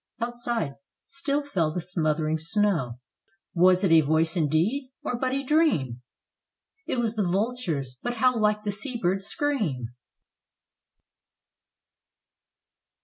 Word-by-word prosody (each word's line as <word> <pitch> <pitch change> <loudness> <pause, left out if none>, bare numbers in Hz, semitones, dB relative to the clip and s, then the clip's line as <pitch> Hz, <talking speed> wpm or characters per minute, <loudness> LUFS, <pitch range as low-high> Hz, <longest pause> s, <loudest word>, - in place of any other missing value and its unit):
Outside 235 - -2 0.3
still 295 -4 0
fell 175 - 0
the 180 - -3
smothering 160 -3 0
snow. 165 - 0 0.5
Was 185 +2 +4
it 190 - +3
a 165 -1 +7
voice 160 +3 +1
indeed? 180 - 0
or - - -2
but 255 +2 -1
a 275 +1 -1
dream! 255 - +1 0.9
It - - -1
was 230 -2 0
the 215 - 0
vulture's, 175 - -2
but 245 - -3
how 250 +2 +3
like 210 -1 +1
the 205 - -1
sea 240 +5 -3
bird's 195 -1 -1
scream. 200 - -1
195 Hz, 120 wpm, -26 LUFS, 160-245 Hz, 0.9 s, a